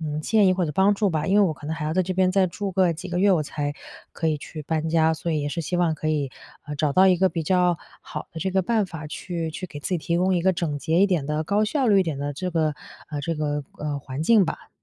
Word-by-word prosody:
嗯， 155 Hz, -1 st, -3 dB
建 210 Hz, +3 st, +3 dB
议 185 Hz, -, +5 dB
或 180 Hz, -1 st, 0 dB
者 150 Hz, -, -2 dB
帮 195 Hz, +6 st, +4 dB
助 200 Hz, -1 st, +1 dB
吧。 155 Hz, +1 st, -1 dB
因 195 Hz, -, +2 dB
为 205 Hz, -, +6 dB
我 -, -, -1 dB
可 150 Hz, -, -11 dB
能 160 Hz, -, -2 dB
还 150 Hz, -, -4 dB
要 155 Hz, -, -1 dB
在 185 Hz, +2 st, +2 dB
这 185 Hz, +1 st, -3 dB
边 185 Hz, 0 st, +3 dB
再 190 Hz, -1 st, +4 dB
住 195 Hz, +2 st, -4 dB
个 180 Hz, -2 st, +3 dB
几 185 Hz, +4 st, -8 dB
个 175 Hz, 0 st, -2 dB
月， 200 Hz, +1 st, +4 dB
我 160 Hz, -4 st, +2 dB
才 145 Hz, 0 st, -3 dB, 0.4 s
可 165 Hz, -, -2 dB
以 155 Hz, -1 st, 0 dB
去 155 Hz, +1 st, -8 dB
搬 160 Hz, +1 st, -1 dB
家。 160 Hz, 0 st, +3 dB
所 165 Hz, +1 st, -3 dB
以 155 Hz, -2 st, 0 dB
也 145 Hz, -, -1 dB
是 170 Hz, -, -3 dB
希 175 Hz, +2 st, -2 dB
望 170 Hz, -3 st, +2 dB
可 155 Hz, -, -3 dB
以， 145 Hz, -4 st, 0 dB, 0.3 s
呃， 150 Hz, -, -6 dB
找 150 Hz, -2 st, +1 dB
到 190 Hz, +1 st, +6 dB
一 180 Hz, -, +4 dB
个 190 Hz, 0 st, +4 dB
比 165 Hz, -2 st, -3 dB
较 180 Hz, +1 st, +2 dB, 0.2 s
好 150 Hz, -, -7 dB
的 160 Hz, -, -7 dB
这 190 Hz, -, -1 dB
个 190 Hz, 0 st, +2 dB
办 220 Hz, +1 st, +1 dB
法 160 Hz, -4 st, -7 dB
去 165 Hz, +1 st, -4 dB
去 185 Hz, +4 st, -6 dB
给 145 Hz, -, -9 dB
自 -, -, -4 dB
己 180 Hz, -2 st, 0 dB
提 170 Hz, +2 st, -1 dB
供 185 Hz, +1 st, +2 dB
一 175 Hz, -, +1 dB
个 190 Hz, +2 st, +3 dB
整 155 Hz, -4 st, -2 dB
洁 165 Hz, +3 st, +1 dB
一 200 Hz, -, +6 dB
点 170 Hz, -8 st, 0 dB
的， 155 Hz, +1 st, -1 dB
高 205 Hz, +5 st, +1 dB
效 265 Hz, +5 st, 0 dB
率 200 Hz, -3 st, +5 dB
一 -, -, +4 dB
点 155 Hz, -5 st, -3 dB
的 145 Hz, +1 st, -3 dB
这 180 Hz, +6 st, -4 dB
个 155 Hz, -3 st, +1 dB, 0.4 s
呃， 145 Hz, -1 st, -3 dB
这 165 Hz, +3 st, -2 dB
个， 150 Hz, -1 st, -2 dB, 0.2 s
呃， 145 Hz, -1 st, -3 dB
环 135 Hz, +1 st, -5 dB
境 200 Hz, +1 st, +5 dB
吧。 -, -, -6 dB
165 Hz, 330 characters per minute, -24 LUFS, 150-185 Hz, 0.4 s, 为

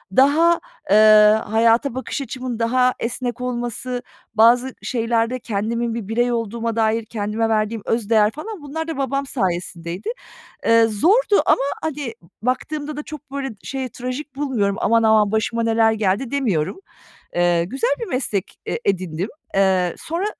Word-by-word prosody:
daha, 320 Hz, +6 st, +5 dB, 0.3 s
eee, 200 Hz, -, +5 dB, 0.5 s
hayata 230 Hz, +4 st, +2 dB
bakış 260 Hz, +2 st, -4 dB
açımın 255 Hz, -2 st, -5 dB
daha 250 Hz, +2 st, +2 dB
esnek 245 Hz, +1 st, -3 dB
olması, 245 Hz, 0 st, -3 dB, 0.3 s
bazı 240 Hz, +4 st, +4 dB
şeylerde 230 Hz, 0 st, 0 dB
kendimin 230 Hz, +2 st, -2 dB
bir 230 Hz, -4 st, -5 dB
birey 240 Hz, +3 st, +1 dB
olduğuma 230 Hz, 0 st, -2 dB
dair 225 Hz, 0 st, +1 dB
kendime 220 Hz, +1 st, -2 dB
verdiğim 215 Hz, 0 st, 0 dB
öz 225 Hz, -2 st, -1 dB
değer, 215 Hz, -1 st, +4 dB
falan, 400 Hz, -, -7 dB
bunlar 320 Hz, +3 st, -5 dB
da 325 Hz, -, -4 dB
babam 275 Hz, 0 st, -1 dB
sayesindeydi. 180 Hz, -5 st, -3 dB, 0.6 s
Eee, 230 Hz, 0 st, +5 dB
zordu 400 Hz, -, +3 dB
ama, -, -, +4 dB, 0.2 s
hani, 290 Hz, -6 st, -3 dB, 0.3 s
baktığımda 290 Hz, +5 st, -2 dB
da 300 Hz, -, -4 dB
çok, 295 Hz, -2 st, -10 dB
böyle, 275 Hz, -1 st, -3 dB
şey, 265 Hz, -2 st, -4 dB
trajik 255 Hz, +4 st, -6 dB
bulmuyorum. 245 Hz, -9 st, 0 dB
"Aman, 230 Hz, +1 st, +3 dB
aman 215 Hz, -2 st, +4 dB
başıma 230 Hz, +1 st, 0 dB
neler 225 Hz, 0 st, +3 dB
geldi!" 220 Hz, +3 st, 0 dB
demiyorum. 220 Hz, -, -1 dB, 0.6 s
Eee, 175 Hz, -1 st, +2 dB
güzel 270 Hz, -, -1 dB
bir 465 Hz, -, -3 dB
meslek 235 Hz, -7 st, -3 dB
e -, -, -1 dB
edindim. 185 Hz, -1 st, -1 dB, 0.3 s
Eee, 190 Hz, -2 st, +2 dB
sonra 335 Hz, +5 st, -3 dB
230 Hz, 145 wpm, -21 LUFS, 215-270 Hz, 0.6 s, daha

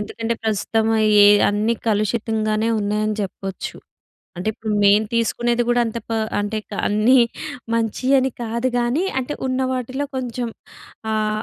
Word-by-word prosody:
ఎందుకంటే, 225 Hz, +2 st, -3 dB
ప్రస్తుతము 220 Hz, +1 st, 0 dB, 0.3 s
ఏ -, -, +8 dB, 0.2 s
అన్నీ 210 Hz, +3 st, +1 dB
కలుషితంగానే 215 Hz, +1 st, 0 dB
ఉన్నాయని 210 Hz, +1 st, 0 dB
జెప్పొచ్చు. 195 Hz, -1 st, -5 dB, 0.6 s
అంటే, 180 Hz, +4 st, -3 dB
ఇప్పుడు 220 Hz, 0 st, -4 dB
మేము 205 Hz, +2 st, +5 dB
తీసుకునేది 240 Hz, +1 st, +1 dB
గూడా 240 Hz, 0 st, +3 dB
అంత 225 Hz, +1 st, -4 dB
పా 225 Hz, -1 st, -1 dB, 0.2 s
అంటే, 205 Hz, +1 st, -2 dB
క -, -, -11 dB, 0.2 s
అన్నీ 215 Hz, +5 st, +4 dB, 0.6 s
మంచియని 255 Hz, +4 st, +1 dB
కాదు 235 Hz, +2 st, -1 dB
గానీ, 245 Hz, +9 st, +1 dB, 0.2 s
అంటే, 280 Hz, +3 st, -4 dB
ఉన్న 255 Hz, 0 st, -1 dB
వాటిలో 260 Hz, +3 st, -3 dB
కొంచం 245 Hz, -2 st, -3 dB, 0.6 s
ఆహ్, 215 Hz, 0 st, 0 dB
225 Hz, 130 wpm, -21 LUFS, 215-240 Hz, 0.6 s, ఏ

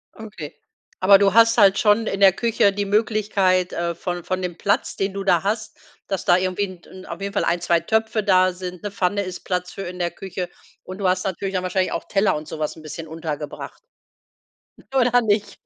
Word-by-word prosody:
Okay, 210 Hz, -9 st, -9 dB, 0.4 s
aber 195 Hz, +1 st, +7 dB
du 195 Hz, -1 st, +3 dB
hast 230 Hz, +1 st, +5 dB
halt 200 Hz, -3 st, +5 dB
schon 210 Hz, +1 st, +3 dB
in 195 Hz, -, -2 dB
der 195 Hz, -2 st, +7 dB
Küche 230 Hz, -1 st, +2 dB
die 200 Hz, +1 st, -2 dB
Möglichkeit, 200 Hz, -3 st, +1 dB
äh, 170 Hz, 0 st, -2 dB
von 175 Hz, 0 st, -4 dB
von 185 Hz, +2 st, -2 dB
dem 175 Hz, -2 st, -3 dB
Platz, 200 Hz, -, 0 dB
den 195 Hz, 0 st, -2 dB
du 195 Hz, 0 st, -4 dB
da 180 Hz, -3 st, +3 dB
hast, 215 Hz, +1 st, -2 dB, 0.3 s
dass 195 Hz, -2 st, -2 dB
da 175 Hz, -, +4 dB
irgendwie 185 Hz, +2 st, -1 dB
'n 185 Hz, -2 st, -12 dB
'n 185 Hz, 0 st, -12 dB
auf -, -, -7 dB
jeden 200 Hz, 0 st, -4 dB
Fall 200 Hz, -, 0 dB
1, 170 Hz, +1 st, 0 dB
2 170 Hz, -1 st, +2 dB
Töpfe 220 Hz, +4 st, 0 dB
da 185 Hz, -2 st, +4 dB
sind, 180 Hz, 0 st, -8 dB
'ne 205 Hz, -, -4 dB
Pfanne 200 Hz, +1 st, 0 dB
ist 185 Hz, -1 st, -6 dB
Platz 180 Hz, -1 st, -3 dB
für 195 Hz, -, -7 dB
in 180 Hz, 0 st, -7 dB
der 175 Hz, -1 st, -1 dB
Küche. 180 Hz, 0 st, -6 dB, 0.3 s
Und 185 Hz, +2 st, -9 dB
du 195 Hz, -, 0 dB
hast 185 Hz, 0 st, +1 dB
natürlich 195 Hz, 0 st, -3 dB
dann 185 Hz, -, -1 dB
wahrscheinlich 185 Hz, 0 st, 0 dB
auch -, -, -3 dB
Teller 195 Hz, 0 st, +2 dB
und 150 Hz, 0 st, -6 dB
so -, -, -7 dB
was 150 Hz, -1 st, -2 dB
'n 160 Hz, -, -13 dB
bisschen 160 Hz, +1 st, -7 dB
untergebracht. 155 Hz, -2 st, -6 dB, 1.1 s
Oder 245 Hz, -1 st, +4 dB
nicht? 205 Hz, -2 st, -1 dB
190 Hz, 220 wpm, -22 LUFS, 180-205 Hz, 1.1 s, aber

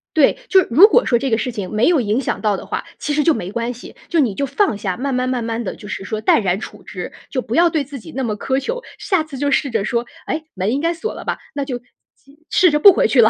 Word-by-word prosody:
对。 310 Hz, -, +4 dB
就 385 Hz, -, +6 dB
是 -, -, -4 dB
如 335 Hz, -, +9 dB
果 465 Hz, -, +3 dB
说 240 Hz, -2 st, +2 dB
这 270 Hz, -, -1 dB
个 225 Hz, -, +2 dB
事 245 Hz, +3 st, -2 dB
情 205 Hz, -6 st, -5 dB
没 215 Hz, +3 st, +2 dB
有 340 Hz, -4 st, +4 dB
影 215 Hz, +1 st, 0 dB
响 270 Hz, -, -2 dB
到 210 Hz, -3 st, +1 dB
的 -, -, -9 dB
话， -, -, -3 dB
其 295 Hz, -, -2 dB
实 300 Hz, -, +2 dB
就 330 Hz, -, +4 dB
没 180 Hz, -, -5 dB
关 235 Hz, +2 st, -2 dB
系， 245 Hz, -, -12 dB
就 340 Hz, -, 0 dB
你 250 Hz, -9 st, +2 dB
就 280 Hz, -, -1 dB
放 335 Hz, -, +1 dB
下， 190 Hz, -3 st, -3 dB
慢 270 Hz, +2 st, -2 dB
慢 255 Hz, 0 st, 0 dB
慢 250 Hz, -2 st, -1 dB
慢 230 Hz, +1 st, -3 dB
地 200 Hz, -, -4 dB
就 205 Hz, -, -11 dB
是 205 Hz, -, -5 dB
说 215 Hz, +2 st, -3 dB
淡 220 Hz, -, +4 dB
然 190 Hz, -1 st, 0 dB
处 -, -, -9 dB
之， -, -, -7 dB, 0.2 s
就 260 Hz, -, -1 dB
不 235 Hz, -2 st, -6 dB
要 340 Hz, +2 st, +5 dB
对 315 Hz, -3 st, 0 dB
自 280 Hz, 0 st, -9 dB
己 -, -, -11 dB
那 265 Hz, -, -1 dB
么 220 Hz, -4 st, -1 dB
苛 265 Hz, +5 st, 0 dB
求。 485 Hz, -, -4 dB, 0.2 s
下 375 Hz, -5 st, 0 dB
次 310 Hz, -3 st, -9 dB
就 285 Hz, +2 st, 0 dB
试 275 Hz, +1 st, +1 dB
着 225 Hz, -4 st, -1 dB
说： 235 Hz, +2 st, -1 dB, 0.2 s
“哎， 315 Hz, -, -3 dB
门 190 Hz, +3 st, -1 dB
应 270 Hz, -, 0 dB
该 335 Hz, +1 st, +1 dB
锁 345 Hz, +7 st, -4 dB
了 -, -, -8 dB
吧？ -, -, -2 dB, 0.2 s
那 280 Hz, -1 st, -2 dB
就 260 Hz, -3 st, -3 dB, 0.4 s
既 280 Hz, +3 st, -23 dB
试 365 Hz, -3 st, +4 dB
着 300 Hz, -, +2 dB
不 395 Hz, +5 st, +9 dB
回 -, -, +2 dB
去 265 Hz, -, +5 dB
了。 220 Hz, -, +6 dB
260 Hz, 325 characters per minute, -19 LUFS, 225-300 Hz, 0.4 s, 如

